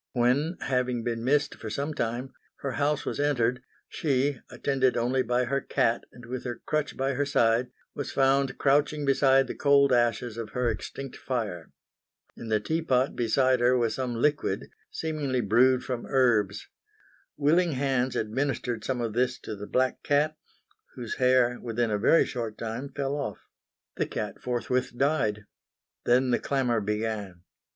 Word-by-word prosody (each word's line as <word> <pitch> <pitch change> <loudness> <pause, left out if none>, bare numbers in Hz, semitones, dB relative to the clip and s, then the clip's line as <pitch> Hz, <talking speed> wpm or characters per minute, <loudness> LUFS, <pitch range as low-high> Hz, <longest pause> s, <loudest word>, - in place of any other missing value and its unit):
When, 135 +8 +1
having 125 -2 0
been 115 -1 -2
missed 145 +3 +2
for 110 - -8
some 140 +8 -3
time, 120 +1 -3 0.3
her 140 - -2
house 145 +4 0
was - - -3
entered 125 -4 +1 0.3
she, 140 -3 0
attended 130 -3 +1
only 125 +3 +1
by 125 +1 +1
her 140 +3 -1
cat 115 -2 0
and 120 -1 -13
with 125 +1 -5
her 120 -2 -5
crutch 155 -1 -1
by 135 +1 0
her 140 +2 0
side, 120 -3 +2 0.2
was 145 - -4
found 135 0 +2
crouching 145 +1 +2
beside 135 -1 +4
the - - -5
cold 140 -2 +4
ashes 120 -1 +1
of 115 -2 -6
her 125 -2 +1
extinct 135 +5 -7
fire. 105 -10 -4 0.6
In 115 - -9
the 110 -1 +2
tea 160 +10 -1
pot 130 -4 +1
beside 130 +2 +2
her 125 +1 +4
was 115 -2 +1
some 125 -2 -3
liquid, 145 +5 0 0.2
seemingly 150 -5 -2
brewed 125 +4 +3
from 125 -2 -4
herbs. 110 -6 +2 0.7
Willing 160 +3 +3
hands 130 -1 0
administered 120 0 -2
some 125 +1 -2
of 115 -2 -2
this 125 +2 +1
to 110 - -6
the 105 0 -8
black 130 0 0
cat, 150 +2 +1 0.6
whose 120 -3 -5
hair, 125 -1 +3
within 115 -1 -1
a 105 - 0
very 165 +9 +5
short 115 -3 -5
time, 115 +5 -5
fell 140 0 -2
off. 140 -8 -3 0.6
The - - 0
cat - - -5
forthwith 125 0 -1
died. 110 -8 +1 0.6
Then 125 +1 +3
the - - +2
clamour 125 -5 0
began. 105 -3 -3
125 Hz, 160 wpm, -27 LUFS, 115-140 Hz, 0.7 s, very